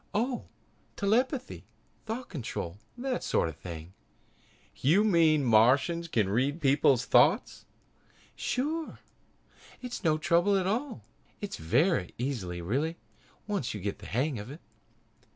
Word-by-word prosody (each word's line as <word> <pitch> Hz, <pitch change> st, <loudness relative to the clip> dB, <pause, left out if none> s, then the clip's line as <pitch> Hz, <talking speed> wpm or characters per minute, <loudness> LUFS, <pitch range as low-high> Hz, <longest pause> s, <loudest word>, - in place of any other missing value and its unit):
"Oh, 245 Hz, +4 st, -1 dB, 0.5 s
telepathy, 250 Hz, +6 st, 0 dB, 0.4 s
thought 240 Hz, +3 st, -4 dB
control 105 Hz, -, -5 dB, 0.2 s
that 255 Hz, 0 st, -2 dB
sort -, -, +1 dB
of 80 Hz, -, -8 dB
thing." 85 Hz, +1 st, -9 dB, 0.8 s
"You 170 Hz, +10 st, +4 dB
mean 165 Hz, -7 st, +4 dB
that 135 Hz, -, -1 dB
Martians 140 Hz, +10 st, +4 dB
can 110 Hz, -, +1 dB
read 130 Hz, -, 0 dB
people's 135 Hz, -3 st, +3 dB
thoughts?" 150 Hz, -, +3 dB, 0.7 s
"Sure! 310 Hz, +5 st, -2 dB, 0.8 s
It's 250 Hz, -4 st, -6 dB
no 155 Hz, -3 st, +3 dB
trouble 175 Hz, +5 st, +3 dB
at 185 Hz, -, 0 dB
all. 230 Hz, +5 st, -2 dB, 0.4 s
It's 205 Hz, -, -5 dB
very 95 Hz, -, +1 dB
easy 100 Hz, -10 st, -3 dB
really, 145 Hz, -, -1 dB, 0.5 s
once 195 Hz, -, -2 dB
you -, -, -4 dB
get 100 Hz, +2 st, -4 dB
the 100 Hz, -, -10 dB
hang 130 Hz, +1 st, -1 dB
of 105 Hz, +4 st, -8 dB
it." 150 Hz, +5 st, -10 dB
155 Hz, 130 wpm, -29 LUFS, -, 0.8 s, You